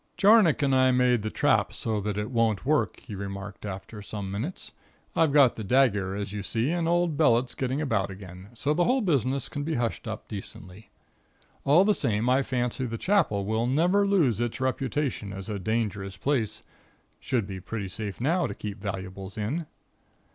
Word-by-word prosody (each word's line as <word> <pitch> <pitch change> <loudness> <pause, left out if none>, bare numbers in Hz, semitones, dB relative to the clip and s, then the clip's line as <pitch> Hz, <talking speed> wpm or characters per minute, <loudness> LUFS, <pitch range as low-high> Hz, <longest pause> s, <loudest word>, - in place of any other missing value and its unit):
"Jarnock 200 -8 +5
and 135 -1 +2
I 130 0 +5
made 125 -2 +3
the 110 - -2
trap - - +2
so 110 -2 -2
that 105 0 -3
it 105 +3 -3
won't 115 -3 +1
work," 150 +2 +1
he 110 - -9
remarked 100 0 -6
after 100 +2 -7
a - - -9
few 105 +1 -6
moments. 105 - -5 0.4
"I've 160 -3 +3
got 140 -4 +5
the 110 - -4
dagger, 100 -5 +2
as 100 0 -4
you 105 - -3
see, 115 +8 -1
and 170 -1 0
old 170 -3 +1
Bellett's 125 -4 +3
getting 130 +1 -2
about 115 -11 0
again, 95 0 -10
so 140 +5 -1
that 150 - 0
the 175 - +3
whole 260 +1 +2
business 135 - +1
can 145 - -5
be 155 +2 -2
hushed 120 0 -2
up, 110 -1 -6
decently. 100 -1 -9 0.8
All 160 +7 +6
the 210 - +4
same 115 - 0
I 130 +2 +4
fancy 125 -1 -1
the 115 0 -4
Chapel 110 - +1
will 110 +3 0
never 180 +9 +3
lose 160 - +3
its 120 +1 -2
reputation 130 -4 -1
as 95 +1 -7
a 105 -2 -3
dangerous 100 -2 -2
place. 120 -2 -1 0.6
Should 120 -6 -1
be 95 -1 -6
pretty 100 +2 -5
safe 100 +1 -6
now 165 +8 +1
to - - -6
keep 105 -1 -6
valuables 95 -1 -6
in." 140 +10 -2
115 Hz, 190 wpm, -27 LUFS, 100-145 Hz, 0.8 s, All